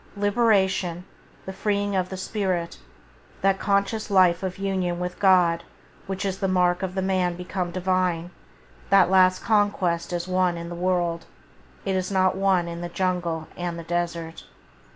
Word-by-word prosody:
Liberation, 195 -4 +1 0.4
the 190 - -6
freeing 205 0 -1
of 185 -1 0
the 190 - -6
spirit, 185 -4 -2 0.6
that 195 0 +2
conscious 200 +2 0
life 185 -3 +4
of 185 -1 -4
union 190 -3 -1
with 180 0 -4
God 180 -4 +4 0.4
which 195 +1 -3
is 190 -1 -2
the 195 - 0
mark 180 -1 +2
of 190 -1 -4
the 190 - -1
man 185 -2 0
become 180 0 -4
Divine, 180 -1 -1 0.6
that 195 -2 +5
last 185 -1 +4
conquest 195 -6 +1
is 175 0 -3
won 185 -1 +1
in 170 0 -6
the - - -6
world, 175 -1 -1 0.6
it 195 -1 0
is 185 -1 -1
not 185 -1 +2
won 190 -3 +2
in 170 0 -6
the 175 - -4
jungle 175 -3 -2
and 175 -1 -4
the 170 - -7
desert. 170 -1 -3
185 Hz, 160 wpm, -24 LUFS, 175-195 Hz, 0.6 s, that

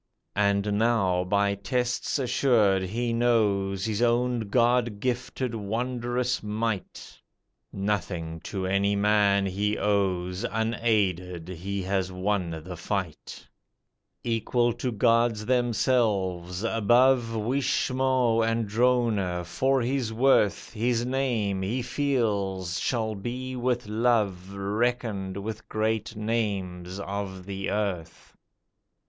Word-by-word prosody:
And 100 0 +2
now, 100 -6 +2
by 100 +2 +1
tests 125 +7 -1
assured, 120 -7 +3
he 115 +5 -2
knows 100 -5 +1
His 110 0 -1
own 120 +1 +2
God 120 -2 +2
gifted 125 +1 -2
wondrous 120 +3 -2
might, 105 -1 -4 0.5
Nothing 90 -5 -2
to 95 -3 -3
any 100 +2 +1
man 100 -1 +3
he 100 +2 -1
owes, 95 -3 0
Unaided 100 -6 0
he 95 +2 -4
has 95 0 -1
won 90 -4 -2
the 90 +1 -7
fight; 90 -2 -5 0.8
Equal 120 +1 +1
to 125 +2 -3
gods 115 0 +2
themselves, 105 -7 +1
above 115 +2 +3
Wishmo 130 0 +1
and 115 0 0
Drona, 110 -6 +1
for 130 +8 +1
his 125 -2 -1
worth 110 -4 +2
His 120 +1 0
name, 120 -7 0
he 115 +7 -1
feels, 105 -10 -1
shall 110 -3 -1
be 125 +5 -5
with 125 -1 -1
love 105 -4 0
Reckoned 105 -1 -1
with 110 +2 -6
great 110 +1 -1
names 100 -5 -2
of 100 -2 -5
the 100 0 -4
earth. 100 -5 -3
105 Hz, 105 wpm, -27 LUFS, 95-120 Hz, 0.8 s, assured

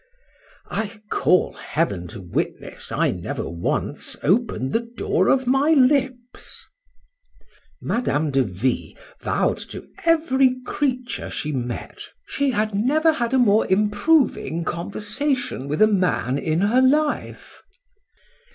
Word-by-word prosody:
I 220 0 -3
call 180 - +2
heaven 100 - -2
to 110 0 -9
witness 90 -2 -4
I - - +1
never - - -4
once 85 +1 -2
opened 180 - +1
the - - +3
door 235 -5 -1
of 265 -1 +3
my 270 +5 +3
lips. 255 -2 0 1.1
Madame 155 - -1
de 135 0 +3
V— 115 +3 -2 0.2
vow'd - - 0
to - - -9 0.2
every 275 -6 +3
creature 255 -4 -2
she 150 - -4
met—"She 130 - -4
had 215 -3 0
never 295 +10 +3
had 235 -5 -2
a - - +4
more 220 -4 +4
improving 210 - +2
conversation 210 - -2
with 150 +8 +2
a - - +7
man 180 - +1
in 160 +3 0
her 225 +6 +3
life." 295 +3 0
215 Hz, 115 wpm, -22 LUFS, 160-260 Hz, 1.1 s, a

